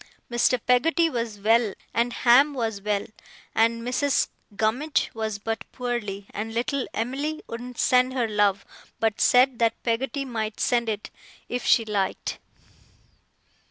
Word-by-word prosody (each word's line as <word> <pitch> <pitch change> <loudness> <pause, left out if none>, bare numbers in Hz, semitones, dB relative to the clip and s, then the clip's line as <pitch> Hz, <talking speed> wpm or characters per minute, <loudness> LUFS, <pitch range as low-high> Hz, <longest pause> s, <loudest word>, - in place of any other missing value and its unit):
Mr. 240 +1 +3
Peggotty 325 +7 +3
was 230 -4 -3
well, 220 0 +3 0.2
and 235 +1 +1
Ham 265 +5 +4
was 225 -5 -2
well, 205 0 -1 0.5
and 230 +1 +2
Mrs. 260 +3 +1 0.3
Gummidge 245 +9 0
was 220 -2 -3
but 225 -1 -4
poorly, 235 -6 -4
and 225 +2 -5
little 270 +2 -1
Em'ly 280 +7 -2
wouldn't 245 +1 -8
send 255 0 +3
her 245 -3 +1
love, 205 -2 +1 0.3
but 220 -1 0
said 250 0 +4
that 230 -1 +1
Peggotty 260 +4 -1
might 220 -4 -4
send 235 -2 +1
it, 210 -1 -4 0.4
if 245 0 -3
she 230 - +5
liked. 205 -3 -2
235 Hz, 135 wpm, -25 LUFS, 220-250 Hz, 0.5 s, she